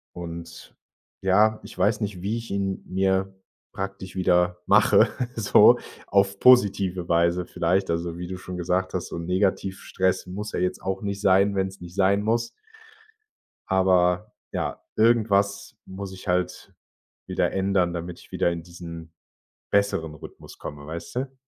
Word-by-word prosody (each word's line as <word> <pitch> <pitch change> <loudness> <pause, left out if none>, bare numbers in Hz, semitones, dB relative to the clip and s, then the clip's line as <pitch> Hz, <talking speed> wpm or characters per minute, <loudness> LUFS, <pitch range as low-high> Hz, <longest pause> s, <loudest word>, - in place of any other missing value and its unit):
und 85 -1 -8 0.5
ja, 105 +3 +3
ich - - -12
weiß 105 +4 +2
nicht, 100 -4 -3
wie 105 +5 -1
ich 115 - -7
ihn 100 -1 -2
mir 95 0 0 0.4
praktisch 95 -1 -6
wieder 90 -1 +2
mache, - - +5 0.3
so 110 -3 +6 0.3
auf 100 0 +2
positive 100 -7 +4
Weise 85 +1 +2
vielleicht. 90 +3 0
Also, 85 0 -2
wie 90 - -5
du 95 0 -5
schon 90 0 -7
gesagt 90 +1 -1
hast, 90 - -2
so - - -5
'n 85 - -5
Negativ-Stress 95 0 0
muss 105 +4 -6
ja - - -1
jetzt 90 0 -1
auch 95 0 -3
nicht 100 0 -3
sein, 100 +1 +4
wenn's 95 0 -2
nicht 90 0 -10
sein 100 +1 +3
muss. 115 +2 0 1.2
Aber 95 +1 +2 0.2
ja, - - -3
irgendwas 100 -3 +2
muss 95 0 -7
ich 95 - -11
halt 90 0 -1 0.5
wieder - - 0
ändern, 95 -2 +1
damit 85 0 -6
ich - - -18
wieder 85 - +1
in 85 -1 -5
diesen 85 -1 -10 0.6
besseren 100 -6 +1
Rhythmus 75 - -12
komme, 70 0 -8
weißt 85 +2 -7
du? 130 +1 -3
95 Hz, 150 wpm, -25 LUFS, 90-100 Hz, 1.2 s, so